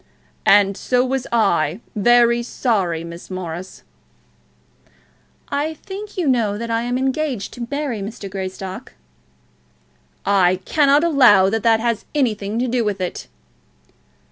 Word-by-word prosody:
"And 200 -1 +5
so 250 +4 +1
was 265 0 -2
I, 190 -7 +1 0.2
very 235 +2 +4
sorry, 195 -9 -1
Miss 170 +1 -10
Morris." 185 -1 -7 1.7
"I 295 +3 -2
think 405 +5 -9
you 350 -5 0
know 225 -6 +1
that 230 +1 -5
I 230 0 +1
am 245 +1 -1
engaged 265 -4 -2
to 235 -1 -6
marry 280 -7 -3
Mr. 205 0 -6
Greystock?" 190 +3 -6 1.3
"I 185 -2 +3
cannot 290 0 +3
allow 240 - +5
that 225 0 0
that 225 0 +3
has 230 -1 -1
anything 215 -6 0
to 250 +2 0
do 240 0 0
with 205 -2 -2
it." 180 -1 -4
230 Hz, 130 wpm, -20 LUFS, 195-255 Hz, 1.7 s, And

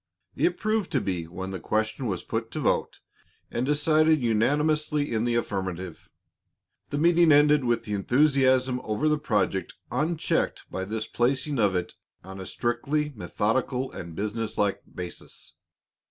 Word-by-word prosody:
It 345 - +1
proved 215 -3 -1
to 135 - +3
be, 90 -6 -2
when 95 +3 -6
the 95 - -4
question 110 +7 -1
was 95 -4 -2
put 115 0 -3
to 155 - -3
vote 140 - 0 0.5
and 125 +2 -1
decided 155 +1 +3
unanimously 145 +6 +1
in 110 +1 +1
the 120 -1 +1
affirmative. 95 -6 -3 0.8
The 145 - -2
meeting 170 +1 +5
ended 145 0 +5
with 120 -1 +1
the 105 - -4
enthusiasm 130 +2 +3
over 110 +8 0
the 150 -1 +2
project 100 -7 0 0.2
unchecked 160 +2 0
by 95 - -3
this 110 +2 -3
placing 130 +3 0
of 100 -3 +3
it 90 -1 -2 0.3
on 95 0 -8
a 95 - -7
strictly 140 +5 -1
methodical 125 +5 -1
and 85 -2 -8
businesslike 105 0 -1
basis. 90 -1 -8
120 Hz, 145 wpm, -26 LUFS, 105-150 Hz, 0.8 s, meeting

